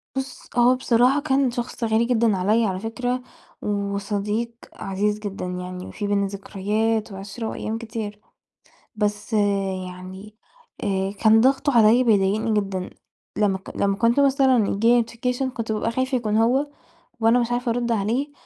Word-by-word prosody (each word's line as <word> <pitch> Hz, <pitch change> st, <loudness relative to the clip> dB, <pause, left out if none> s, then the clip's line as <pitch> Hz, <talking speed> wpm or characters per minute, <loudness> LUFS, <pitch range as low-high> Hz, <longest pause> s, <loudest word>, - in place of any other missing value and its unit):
بُص، 265 Hz, -1 st, -5 dB
هو 245 Hz, +1 st, +5 dB
بصراحة 255 Hz, +2 st, +3 dB
كان 270 Hz, -3 st, +1 dB
شخص 240 Hz, 0 st, -5 dB
غالي 225 Hz, +1 st, +2 dB
جدًا 230 Hz, -4 st, +2 dB
عليَّ 215 Hz, +5 st, +2 dB
على 185 Hz, -2 st, -2 dB
فكرة، 245 Hz, +4 st, -2 dB, 0.4 s
وصديق 205 Hz, +2 st, -2 dB, 0.2 s
عزيز 205 Hz, +2 st, -2 dB
جدًا 200 Hz, -3 st, -5 dB
يعني، 180 Hz, 0 st, -6 dB
في 205 Hz, -, -4 dB
بيننا 200 Hz, -1 st, +1 dB
ذكريات 210 Hz, +3 st, -2 dB
وعِشرة 200 Hz, +4 st, -6 dB
وأيام 220 Hz, +1 st, -4 dB
كتير. 220 Hz, -2 st, -6 dB, 0.8 s
بس 210 Hz, +1 st, -2 dB, 0.5 s
يعني، 190 Hz, +4 st, -10 dB, 0.5 s
آآ 195 Hz, -1 st, -1 dB
كان 220 Hz, 0 st, +6 dB
ضغطُه 270 Hz, +3 st, +3 dB
عليَّ 225 Hz, +3 st, +5 dB
بيضايقني 215 Hz, 0 st, +2 dB
جدًا. 190 Hz, -2 st, -4 dB, 0.5 s
لما 200 Hz, -2 st, +1 dB
ك 190 Hz, -, -11 dB
لما 200 Hz, 0 st, +1 dB
كنت 235 Hz, +5 st, +3 dB
مثلًا 265 Hz, -5 st, +4 dB
ييجي 215 Hz, +4 st, +1 dB
لي 240 Hz, 0 st, +5 dB
notification، 250 Hz, +3 st, -2 dB
كنت 230 Hz, -2 st, -3 dB
بابقى 215 Hz, +1 st, -1 dB
خايفة 260 Hz, +2 st, 0 dB
يكون 215 Hz, -3 st, -1 dB
هو، 250 Hz, +6 st, +3 dB, 0.5 s
وأنا 225 Hz, +2 st, +4 dB
مش 240 Hz, 0 st, -1 dB
عارفة 245 Hz, 0 st, 0 dB
أرُد 240 Hz, 0 st, 0 dB
عليه، 230 Hz, +7 st, -1 dB
220 Hz, 150 wpm, -23 LUFS, 200-240 Hz, 0.8 s, كان